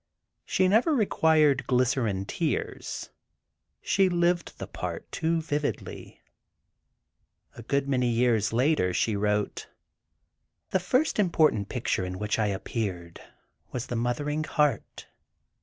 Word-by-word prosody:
She 185 - +2
never 235 - +3
required 155 - +3
"glycerine 125 -6 +1
tears"—she 170 - -3
lived 175 0 0
the - - -5
part - - -6
too 165 0 0
vividly. 150 -2 -4 1.3
A - - -10
good 140 +4 -1
many 125 -3 +1
years 115 -3 +2
later, 120 - +2
she 110 - +1
wrote: 105 0 -1 1.0
"The 190 - +2
first 250 - +1
important 155 - +2
picture 120 -6 -1
in 90 0 -4
which 105 +2 -1
I 105 - +2
appeared 95 -4 -4 0.5
was 125 -1 -4
'The 120 - -4
Mothering 145 +6 -1
Heart. 150 -8 -1
130 Hz, 110 wpm, -27 LUFS, 110-160 Hz, 1.3 s, never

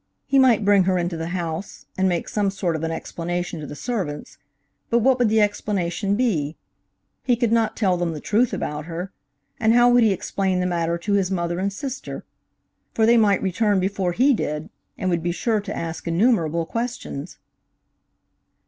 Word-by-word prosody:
He 275 - +3
might 240 -6 +4
bring 200 -2 +5
her 185 0 +2
into 175 0 -1
the 165 0 -4
house, 175 +1 -5
and 190 0 +2
make 175 -2 -1
some 205 -2 0
sort 190 -4 -2
of 160 - -4
an 165 - -1
explanation 175 +1 -4
to 150 - -7
the - - -8
servants, 180 - -4 0.5
but 235 - +3
what 255 +2 +3
would 240 -3 +3
the 220 0 +3
explanation 200 -1 0
be? 170 - 0 0.6
He 250 -2 +2
could 235 -1 0
not 230 -1 +1
tell 190 -5 +2
them 175 -1 -1
the 155 - -6
truth 220 +9 +1
about 150 0 -4
her, 175 +3 -5 0.5
and 225 -1 +3
how 245 0 +6
would 245 0 +5
he 220 -2 +4
explain 190 -1 -1
the 180 - 0
matter 170 -1 0
to 200 +4 -2
his 195 -2 +2
mother 175 -2 -1
and 200 +1 0
sister? 265 +6 -6 0.7
For 220 - +3
they 235 +1 +5
might 210 -4 +3
return 200 +1 +1
before 190 -1 -1
he 265 +9 +4
did, 150 -8 -3 0.3
and 185 - -1
would 170 -1 0
be 175 +1 -1
sure 215 +4 0
to 205 0 -6
ask 165 0 -5
innumerable 170 -3 +2
questions. 230 - -5
190 Hz, 190 wpm, -23 LUFS, 170-220 Hz, 0.7 s, how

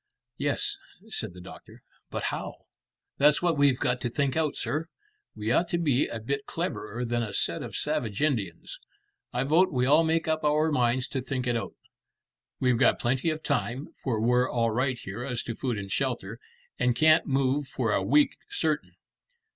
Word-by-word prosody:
"Yes," 415 0 -1 0.3
said 110 - -3
the 90 - -10
doctor; 90 - -13 0.3
"but - - -4
how?" - - -6 0.5
"That's 145 +1 +6
what 170 -2 +3
we've 140 -3 +4
got 125 0 0
to 120 - -1
think 140 +2 0
out, 160 -2 +1
sir. 155 +2 -2 0.5
We 105 +2 -2
ought 170 +8 +2
to 170 - 0
be 145 -6 +2
a 115 - -5
bit 140 +5 -3
cleverer 125 - -3
than 120 0 0
a 105 -4 -4
set - - +1
of - - -6
savage 110 -4 -1
Indians. 110 - -1 0.5
I 125 +1 0
vote 165 +7 +4
we 125 -3 +1
all 150 +5 +5
make 160 0 +1
up 160 0 0
our 150 +1 +2
minds 125 -1 +1
to 135 - -2
think 130 -1 -3
it 120 -1 +1
out. 115 - -4 0.8
We've 125 -3 +2
got - - +4
plenty 130 +6 0
of 155 0 -3
time, 140 0 -1
for 120 -5 0
we're 125 +3 +3
all 115 -1 +1
right 130 +3 0
here 110 +1 -6
as 125 -3 -3
to 115 - -4
food 125 -3 -2
and 100 -1 -6
shelter, 120 -4 -2 0.4
and 125 -1 +2
can't 155 +3 +5
move 135 +1 +1
for 125 -4 -1
a - - +2
week 295 -1 +3
certain." 405 0 -1
130 Hz, 185 wpm, -27 LUFS, 120-150 Hz, 0.8 s, That's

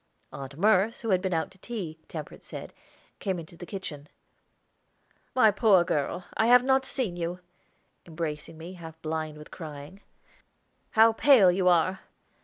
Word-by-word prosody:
Aunt 140 0 -8
Merce, 210 +4 +3
who 225 -3 -2
had 185 -1 +3
been 190 -1 -2
out 160 +1 -1
to 190 - -20
tea, 180 -9 -6
Temperance 155 -3 -8
said, - - -8 0.5
came 190 -3 -2
into 170 0 -9
the 175 +1 -10
kitchen. 155 -7 -7 1.3
"My 220 -4 +6
poor 200 -3 +5
girl, 170 +2 -2
I 220 - +2
have 245 +1 +7
not 265 0 +2
seen 230 -10 -2
you," 175 +1 -3 0.7
embracing 160 -1 -5
me, 165 +3 -9
half 165 -3 -11
blind 155 -1 -3
with 150 - -12
crying, 155 +3 -9 0.9
"How 225 +1 +6
pale 225 -6 +6
you 185 0 +1
are! 180 +2 +3
180 Hz, 155 wpm, -27 LUFS, 160-210 Hz, 1.3 s, have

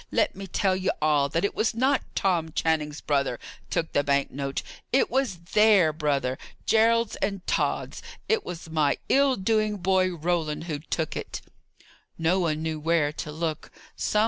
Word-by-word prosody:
Let - - +1
me 195 0 -7
tell 190 +1 +1
ye 185 0 -1
all, 150 -2 +2
that 165 +6 0
it - - -1
was 220 +1 0
not 265 +3 +2
Tom 170 -5 0
Channing's 155 -3 0
brother 140 -4 0 0.3
took 165 -1 -2
the 145 - +2
bank 140 -1 +1
note; 140 0 -3 0.3
it 265 - +3
was 260 -7 0 0.2
their 210 -7 +5
brother 140 -4 -1 0.3
Gerald's 225 +1 +3
and 195 -3 -2
Tod's! - - -1 0.3
It 445 -1 +1
was 170 -1 -7
my 155 -3 +2
ill 275 -1 +4
doing 215 +1 +1
boy, 185 0 +2
Roland, 160 -2 -1
who 155 -4 -4
took 160 +1 -3
it." - - -5 0.8
No 170 +3 +2
one 160 -3 0
knew 160 -1 -2
where 160 -1 +2
to 150 0 -6
look. 160 0 -3
165 Hz, 165 wpm, -26 LUFS, 150-200 Hz, 0.8 s, their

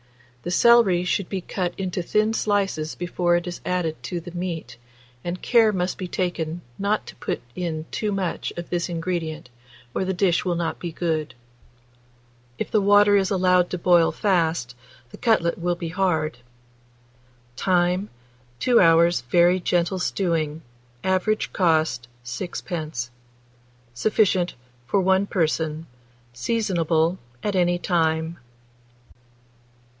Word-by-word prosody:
The 175 - -5
celery 195 -3 +5
should 185 0 -1
be 190 -2 -3
cut 180 -1 -3
into 185 -1 -2
thin 215 +5 +1
slices 195 -8 0
before 175 0 0
it 175 0 0
is 175 -1 -6
added 175 -3 -2
to 175 - -4
the 170 +1 -9
meat, 175 -4 -5 0.5
and 175 +1 -4
care 230 -3 +4
must 180 -2 -2
be 185 - -3
taken 175 -2 -2 0.2
not 205 +2 0
to - - -10
put - - -3 0.2
in 165 -3 -3
too 210 -2 -1
much 195 -3 -2
of 175 - -6
this 175 0 -1
ingredient, 165 -5 -3 0.4
or - - 0
the 190 0 -2
dish 180 -2 +2
will 180 -2 0
not 170 -1 -2
be 175 - -4
good. 160 -4 -2 1.2
If - - -4
the 215 - +3
water 205 +1 +5
is 195 -2 +3
allowed 180 -2 +3
to 180 - -3
boil 175 -1 +4
fast, 165 - 0 0.4
the - - -10
cutlet 180 -9 +2
will 175 +1 0
be 170 -1 -5
hard. 160 -7 0 1.2
Time. 180 +4 +1 0.5
2 245 -2 +4
hours' 170 0 +5
very 175 +5 +4
gentle 175 +1 0
stewing. 160 -5 -1 0.4
Average 190 +3 0
cost, 160 -9 +1 0.2
6d. 155 -3 -4 0.8
Sufficient 185 - +1 0.3
for 195 - +2
1 190 +1 +3
person. 160 -3 -1 0.5
Seasonable 170 - 0 0.2
at 205 -2 -1
any 175 -1 +2
time. 165 -2 0
175 Hz, 130 wpm, -24 LUFS, 165-190 Hz, 1.2 s, celery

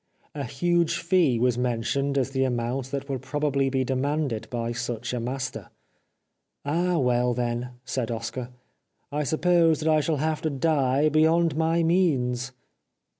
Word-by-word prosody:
A 140 -2 -4
huge 175 +6 +1
fee 170 -7 +2
was 125 0 +1
mentioned 125 +3 0
as 135 0 0
the 135 -1 +1
amount 125 +1 -2
that 140 0 -4
would 135 -3 -3
probably 140 0 0
be 130 0 0
demanded 130 -3 -1
by 120 -1 -2
such 120 0 -4
a 125 - -1
master. 130 +3 -4 0.5
" - - -51
Ah, 175 +4 +1
well, 125 -3 +2
then," 120 0 -2
said 125 -2 -2
Oscar, 115 +2 -4 0.3
" - - -49
I 150 +1 -1
suppose 165 +2 +3
that 160 - -2
I 155 - +4
shall 150 +1 0
have 155 +2 -1
to 160 - 0
die 140 -1 +2
beyond 160 +1 +3
my 165 +1 +2
means." 135 -8 +1
135 Hz, 160 wpm, -26 LUFS, 125-155 Hz, 0.5 s, I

